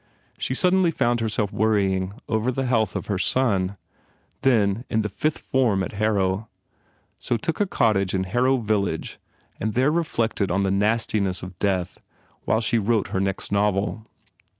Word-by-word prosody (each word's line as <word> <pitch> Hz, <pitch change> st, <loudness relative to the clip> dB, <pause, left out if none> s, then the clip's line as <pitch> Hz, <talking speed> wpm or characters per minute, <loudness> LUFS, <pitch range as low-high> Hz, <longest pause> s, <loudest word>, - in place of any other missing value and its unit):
She 130 Hz, -, -1 dB
suddenly 180 Hz, +2 st, +3 dB
found 120 Hz, -6 st, +1 dB
herself 105 Hz, -2 st, -1 dB
worrying 100 Hz, -3 st, +1 dB
over 110 Hz, +3 st, 0 dB
the 135 Hz, +1 st, -2 dB
health 115 Hz, -4 st, +1 dB
of -, -, -3 dB
her 100 Hz, -3 st, -2 dB
son, 100 Hz, -6 st, +1 dB, 0.6 s
then 110 Hz, -4 st, +2 dB
in 110 Hz, -, +1 dB
the 105 Hz, -, -2 dB
Fifth 150 Hz, +9 st, -1 dB
Form 115 Hz, -8 st, +1 dB
at -, -, -4 dB
Har 110 Hz, +1 st, 0 dB
row, 95 Hz, +2 st, 0 dB, 0.7 s
so 120 Hz, -, 0 dB
took 160 Hz, +8 st, -3 dB
a 205 Hz, -, +2 dB
cottage 100 Hz, -, +1 dB
in 95 Hz, -, 0 dB
Harrow 125 Hz, +7 st, +2 dB
village 105 Hz, -4 st, -2 dB, 0.4 s
and 110 Hz, 0 st, -2 dB
there 130 Hz, +4 st, +3 dB
reflected 115 Hz, -, 0 dB
on 95 Hz, +3 st, +1 dB
the 95 Hz, -, +1 dB
nastiness 105 Hz, -2 st, 0 dB
of 90 Hz, 0 st, -9 dB
death 95 Hz, -3 st, -1 dB, 0.5 s
while 110 Hz, -, +2 dB
she 115 Hz, +1 st, +2 dB
wrote 110 Hz, 0 st, 0 dB
her 95 Hz, -, -1 dB
next 95 Hz, 0 st, -2 dB
novel. 105 Hz, +2 st, 0 dB
110 Hz, 165 wpm, -24 LUFS, 100-120 Hz, 0.7 s, suddenly